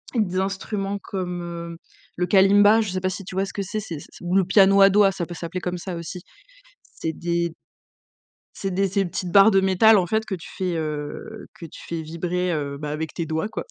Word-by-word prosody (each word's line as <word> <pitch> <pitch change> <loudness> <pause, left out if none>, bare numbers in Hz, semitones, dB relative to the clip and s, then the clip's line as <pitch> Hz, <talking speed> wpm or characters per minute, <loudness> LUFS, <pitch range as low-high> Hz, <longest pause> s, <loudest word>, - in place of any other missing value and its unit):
des 185 -4 +1
instruments 195 +1 -2
comme, 180 -2 -4
heu, 170 -1 -7 0.4
le 180 - +1
kalimba, 205 +3 +6
je 205 -4 -3
sais 185 0 -3
pas 185 - 0
si 195 +1 -6
tu 185 - -9
vois 195 +1 +1
ce - - -9
que 200 - -3
c'est, 210 +3 -3 0.4
ou 175 +2 -2
le 195 - +5
piano 195 +1 +5
à 195 - +8
doigt, 200 0 +4
ça 180 -2 -4
peut 175 +1 -8
s'appeler 175 +2 -5
comme 180 0 -3
ça 175 0 -6
aussi. 170 +2 -7 0.7
C'est 160 0 -4
des 170 0 -2 1.0
C'est 195 -2 -3
des 195 +1 +1
ces 195 +1 0
petites 180 0 -4
barres 200 +3 +7
de 195 -2 +4
métal 190 +3 +5
en 180 -2 +2
fait 220 +4 0
que 195 - -4
tu 170 - -9
fais, 180 -2 -1
heu, 150 -2 -5
que 165 - -9
tu - - -13
fais 165 -1 -4
vibrer, 175 +3 -2
heu 140 -2 -3
bah 150 0 -5
avec 155 +1 -4
tes 170 - -2
doigts 160 +5 -2
quoi, - - -5
185 Hz, 225 wpm, -23 LUFS, 170-195 Hz, 1.0 s, à